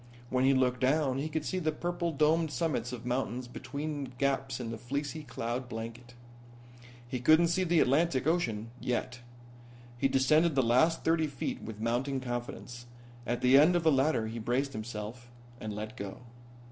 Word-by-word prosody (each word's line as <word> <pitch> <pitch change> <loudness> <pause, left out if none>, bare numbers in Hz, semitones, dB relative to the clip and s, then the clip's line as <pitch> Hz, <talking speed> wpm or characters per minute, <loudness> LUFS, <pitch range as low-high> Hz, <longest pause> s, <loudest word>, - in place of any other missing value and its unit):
When 130 0 +2
he 135 0 +5
looked 125 -1 +2
down 135 0 +2
he 150 +3 -2
could 155 0 -2
see 185 - -1
the 160 -3 0
purple 175 +2 -2
domed 155 +2 +2
summits 130 -4 -1
of 120 -2 -7
mountains 125 0 -2
between 140 +1 -5
gaps 135 0 0
in 115 -2 -4
the 115 - -4
fleecy 140 +5 -3
cloud 120 -1 -4
blanket. 115 +2 -7 0.9
He 125 0 -3
couldn't 155 +6 +5
see 185 +2 +1
the 170 -2 +3
Atlantic 140 0 +2
Ocean 115 -10 0
yet. 125 0 -2 0.8
He 135 - +3
descended 145 +4 +3
the 135 - +4
last 130 +8 +3
thirty 160 -1 +2
feet 135 -4 -4
with 110 -2 -8
mounting 125 +4 0
confidence. 120 -1 -6 0.4
At 120 - -1
the 130 +2 +7
end 165 +5 +5
of 175 - +2
the 160 - +5
ladder 135 -4 +2
he 115 +1 -5
braced 130 +5 -1
himself 110 +2 -6 0.3
and 110 - -5
let 110 +1 -6
go. 100 +2 -7
130 Hz, 170 wpm, -31 LUFS, 120-155 Hz, 0.9 s, the